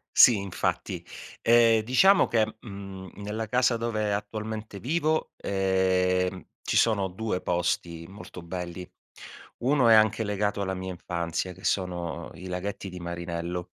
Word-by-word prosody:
Sì, 120 - +8
infatti. 100 -2 -3 0.4
Ehm, 115 -1 +5
diciamo 190 - +5
che, 110 -1 +1
mhmm, 100 -3 -9
nella 110 +2 -4
casa 125 +1 +2
dove 110 -2 -1
attualmente 105 0 -5
vivo, 155 - 0
ehm, 95 -1 +1 0.2
ci - - -2
sono 105 -4 +3
2 95 0 -3
posti 85 -1 -1
molto 95 -1 -10
belli. 90 +1 -6 0.7
1 130 -1 +3
è - - +8
anche 110 +1 +4
legato 105 -1 -1
alla 95 -1 -1
mia 95 0 -5
infanzia, 85 0 -3
che - - -17
sono 85 -3 -2
i 90 +4 -9
laghetti 95 +2 -4
di 90 0 -8
Marinello. 85 0 -4
100 Hz, 135 wpm, -27 LUFS, 90-110 Hz, 0.7 s, Sì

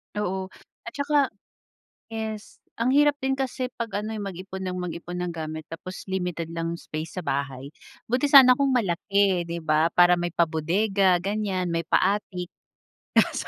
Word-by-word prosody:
Oo, 190 -2 -2 0.4
at 230 - -6
saka 285 -1 +2 0.8
yes, 220 -1 -6 0.2
ang 235 - +1
hirap 295 0 +5
din 265 0 0
kasi 260 -1 -2
pag 230 -2 -4
ano, 220 +1 -4
eh, - - -4
mag-ipon 190 0 -6
nang 180 0 -3
mag-ipon 175 0 -5
ng 180 -1 -2
gamit 155 -1 -5
tapos 185 +4 -8
limited 180 -3 -2
lang 165 0 -2
'yung 170 - -5
space 155 +3 -6
sa - - -7
bahay, 135 -1 -3 0.4
buti 250 +5 +1
sana 255 -3 +9
kung 275 0 +1
malaki, 195 -3 +2
di 170 0 -5
ba, 155 +1 +2
para 175 0 +6
may 175 -1 -2
pa 170 -1 +2
bodega 185 +3 +2
ganiyan, 195 -2 -1
may 165 0 -1
pa 165 - +3 0.2
attic, 180 -4 -6 0.7
kaso - - +2
185 Hz, 170 wpm, -25 LUFS, 170-220 Hz, 0.8 s, sana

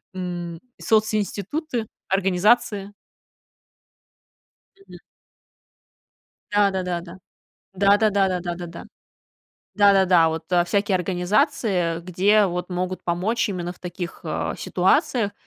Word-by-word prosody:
м, 175 -2 -5 0.2
социнституты, 220 - -1 0.2
организации. 200 +2 +1 1.9
Мгм. - - -12 1.5
Да 205 -1 +3
да 190 -1 -2
да 175 -1 -2
да. 170 +1 -11 0.6
Да 200 +1 +4
да 215 +1 +2
да 195 -1 +2
да 180 -1 -2
да 175 0 -4
да 175 0 -6
да. 170 0 -10 0.9
Да-да-да. 190 -5 +5
Вот, 160 0 -4
а, 175 -1 +4
всякие 200 +3 0
организации, 180 - 0
где 195 +4 +3
вот 180 0 -4
могут 185 +1 -3
помочь 190 +7 0
именно 175 -3 -4
в 180 - -22
таких, 175 -1 -6
а, - - -2
ситуациях, 220 -5 +1
190 Hz, 115 wpm, -23 LUFS, 175-205 Hz, 1.9 s, Да-да-да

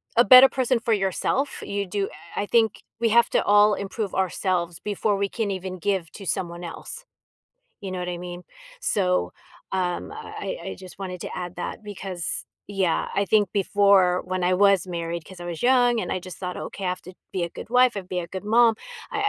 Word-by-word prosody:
a 240 - +7
better 255 +4 +10
person 255 -2 +1
for 230 0 +1
yourself. 205 +8 0
You 200 0 -3
do 195 +1 -2 0.3
I - - 0
I - - -3
think, 225 -1 +2 0.2
we 230 0 +2
have 235 +1 +5
to - - +2
all 205 0 +5
improve 200 0 -4
ourselves, 180 -2 -1
before 205 0 -1
we 200 0 0
can 220 -2 -2
even 185 -1 -4
give 180 -2 -1
to 200 - -9
someone 175 -1 -3
else. 455 - -8 0.8
You 195 - -6
know 185 - -4
what 180 0 -4
I 175 - -4
mean? 175 0 -7 0.4
So, 180 - +1 0.4
um, 185 - -2
I 440 +2 -6
I - - -6
just 185 -1 -12
wanted 185 -2 -6
to - - -5
add 180 -1 -5
that, - - -5
because 190 -4 -5 0.2
yeah, 195 -4 0
I 200 - +2
think 205 +1 +3
before, 200 -2 +4
when 185 0 -2
I 180 +1 +3
was 195 -1 +4
married 170 -2 -4
'cause 185 +1 -13
I - - -6
was 170 -2 -5
young, 245 -1 +4
and - - -3
I - - -1
just 185 0 -9
thought, 180 -1 -4
"Okay, 195 - -6
I - - +1
have 185 - -4
to 185 - -11 0.2
be 185 - -1
a 170 - -1
good - - -10
wife. 250 0 +5
I - - 0
have - - -14
to - - -26
be 180 - -2
a 170 - -6
good 190 +1 -6
mom." 230 +2 +5 0.4
I 425 - -2
195 Hz, 220 wpm, -24 LUFS, 180-215 Hz, 0.8 s, better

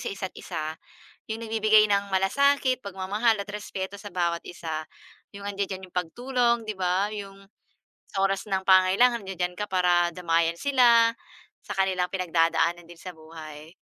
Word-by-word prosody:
sa - - -4
isa't-isa, 185 -5 -5 0.6
yung 225 - -5
nagbibigay 215 -1 +4
ng 200 -1 0
malasakit, 260 +6 +2
pagmamahal, 200 +3 0
at 200 - -7
respeto 200 -1 -5
sa 205 0 -10
bawat 170 -1 -1
isa, 160 -3 -5 0.5
yung 200 0 -7
andiya-diyan 195 -2 -4
iyong 180 - -28
pagtulong, 235 +6 0
'di 210 - -3
ba? 185 +2 +1
Yung 195 -1 -9 0.7
sa 195 - -2
oras 195 +2 -1
ng 190 -1 0
pangangailangan 190 +6 +5
nandiya-diyan 180 -1 -2
ka 210 - -2
para 175 -2 +3
damayan 165 -1 +1
sila, 240 -3 +5 0.6
sa - - -5
kanilang 185 -2 +1
pinagdadaanan 170 -1 +1
din 175 - -12
sa 185 - -8
buhay. 155 0 -11
190 Hz, 145 wpm, -26 LUFS, 175-210 Hz, 0.7 s, pangangailangan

